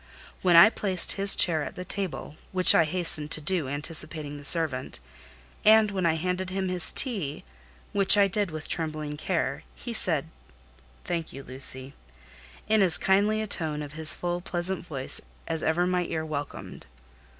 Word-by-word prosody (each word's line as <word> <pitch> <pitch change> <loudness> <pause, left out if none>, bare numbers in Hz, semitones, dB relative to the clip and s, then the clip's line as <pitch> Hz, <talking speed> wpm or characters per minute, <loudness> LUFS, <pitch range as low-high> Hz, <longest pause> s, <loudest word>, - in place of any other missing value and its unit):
When 180 -2 +2
I 195 +6 +7
placed 190 -6 +2
his 195 0 +1
chair 160 -3 +2
at - - -7
the 180 - -8
table, 185 -6 -6 0.2
which 185 -1 +6
I 165 - +3
hastened 160 -3 +2
to - - -2
do, 155 -1 0
anticipating 145 0 -1
the - - -13
servant, 145 -4 -1 0.6
and 215 -1 +4
when 190 -3 -2
I 160 - 0
handed 180 +3 -4
him 190 0 -4
his 180 -2 +4
tea, 195 - -1 0.5
which 200 +1 +4
I 200 -1 +4
did 200 0 -2
with 155 -1 -9
trembling 155 -3 -4
care, - - -4
he - - -8
said: - - 0 0.8
"Thank 170 -2 -5
you, 135 - -10
Lucy," 130 0 +1 0.7
in 215 0 +2
as 175 -4 +5
kindly 205 +3 0
a - - -4
tone 155 -6 -3
of 145 0 -11
his 155 0 +6
full 175 0 -4
pleasant 175 +1 -2
voice 135 -3 +2 0.3
as 160 -1 -4
ever 165 +3 -1
my 180 -1 -2
ear 160 -1 -5
welcomed. 145 -2 -8
170 Hz, 170 wpm, -25 LUFS, 155-190 Hz, 0.8 s, I